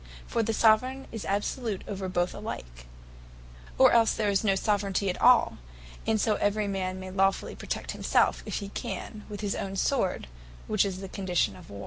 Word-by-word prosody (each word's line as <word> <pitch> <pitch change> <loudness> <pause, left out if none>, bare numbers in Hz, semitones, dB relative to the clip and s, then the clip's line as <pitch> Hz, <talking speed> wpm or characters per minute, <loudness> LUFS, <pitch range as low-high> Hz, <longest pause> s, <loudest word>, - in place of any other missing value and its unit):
For 230 - 0
the 225 0 0
Soveraign 240 +5 +3
is 225 -2 -6
absolute 205 +1 -2
over 195 -2 -4
both 175 0 0
alike; - - -7 0.9
or - - +7
else 230 -1 +4
there 210 -2 +1
is 195 +1 +1
no 195 -3 +3
Soveraignty 200 -1 0
at - - -8
all; 250 0 +5 0.5
and 220 -1 +2
so 215 0 +2
every 205 0 +1
man 185 -1 -2
may 185 0 -7
Lawfully 195 0 +1
protect - - -4
himselfe, - - +2
if - - -3
he 200 -1 -4
can, 210 +1 -6
with 205 -1 -6
his 205 -2 -1
own 195 0 -4
sword, 195 - 0 0.4
which 215 -2 +2
is 190 -1 -4
the 195 - -6
condition 185 -2 0
of 180 -3 -14
war. 100 - -8
200 Hz, 185 wpm, -28 LUFS, 190-215 Hz, 0.9 s, or